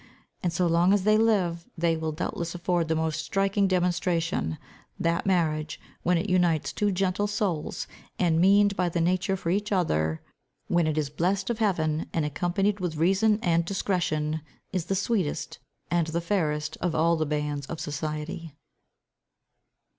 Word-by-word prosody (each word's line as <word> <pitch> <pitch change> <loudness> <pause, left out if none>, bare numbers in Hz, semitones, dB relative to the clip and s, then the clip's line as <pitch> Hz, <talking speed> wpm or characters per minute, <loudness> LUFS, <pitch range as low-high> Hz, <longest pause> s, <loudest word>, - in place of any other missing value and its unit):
And 175 - 0
so 175 +2 +1
long 170 +3 +4
as 205 -2 +2
they 215 +1 +4
live, 190 -7 +1
they 165 0 +2
will 160 0 -2
doubtless 170 +1 -4
afford 175 -1 0
the 160 - +1
most 160 -1 -1
striking 195 0 +1
demonstration, 175 - 0 0.4
that 170 +3 0
marriage, 160 -5 0 0.2
when 180 +1 +2
it 165 - -1
unites 175 -4 +2
two 205 -1 +1
gentle 195 +2 0
souls, 195 -7 -2 0.3
and 165 -3 +2
meaned 200 +2 +5
by 180 -2 +1
nature 180 +3 +1
for 170 -2 -2
each 205 +3 -1
other, 80 - +1 0.5
when 175 -2 +2
it 155 0 -1
is 145 -2 -1
blest 190 +8 0
of 235 - -4
heaven, 160 -7 0
and 160 -2 +1
accompanied 180 +7 0
with 175 -3 -2
reason 195 +7 +3
and 170 -1 +3
discretion, 160 -5 -1 0.3
is 180 -4 -1
the 195 - -1
sweetest, 195 -5 -1 0.3
and 170 -2 +2
the 165 +1 -1
fairest 155 -5 -1
of 170 -2 0
all 165 +2 +3
the 160 -2 -1
bands 150 -1 -2
of 165 - -5
society. 155 +1 -4
170 Hz, 160 wpm, -27 LUFS, 160-190 Hz, 0.5 s, meaned